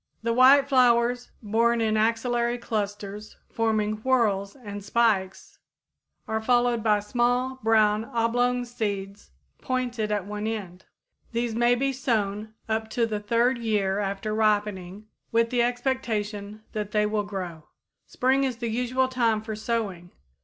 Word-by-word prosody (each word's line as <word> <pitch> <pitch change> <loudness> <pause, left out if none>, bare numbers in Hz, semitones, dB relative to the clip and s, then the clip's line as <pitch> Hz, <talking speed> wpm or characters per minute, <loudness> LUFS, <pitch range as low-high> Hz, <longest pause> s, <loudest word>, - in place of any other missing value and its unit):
The 230 0 +1
white 270 +3 +6
flowers, 245 -2 +3
borne 230 +3 +2
in 220 -1 +1
axillary 235 +2 +1
clusters 210 -2 -5
forming 215 -2 0
whorls 215 -5 +1
and 205 -6 -8
spikes, 200 -3 0 0.7
are 220 0 -1
followed 240 0 +2
by 210 -1 +3
small, 245 +4 0
brown, 215 -1 +3
oblong 245 +2 0
seeds 205 -4 -4 0.3
pointed 245 -4 -2
at 205 -3 -1
one 210 +1 -4
end. 190 -5 -5 0.5
These 235 0 -1
may 240 +2 +3
be 270 +2 0
sown 220 -4 -2
up 220 0 -2
to 230 +1 +1
the 215 -2 -3
third 235 +4 +1
year 205 -4 0
after 200 +1 -2
ripening 210 -2 0 0.3
with 230 0 +2
the 245 -1 +2
expectation 220 -4 -2
that 210 -1 -4
they 210 -1 +3
will 210 0 0
grow. 185 -6 -6 0.4
Spring 265 +2 +1
is 255 -3 -1
the 235 -1 -3
usual 250 +3 0
time 235 -4 +1
for 220 0 -6
sowing. 210 -6 -3
220 Hz, 140 wpm, -26 LUFS, 210-240 Hz, 0.7 s, white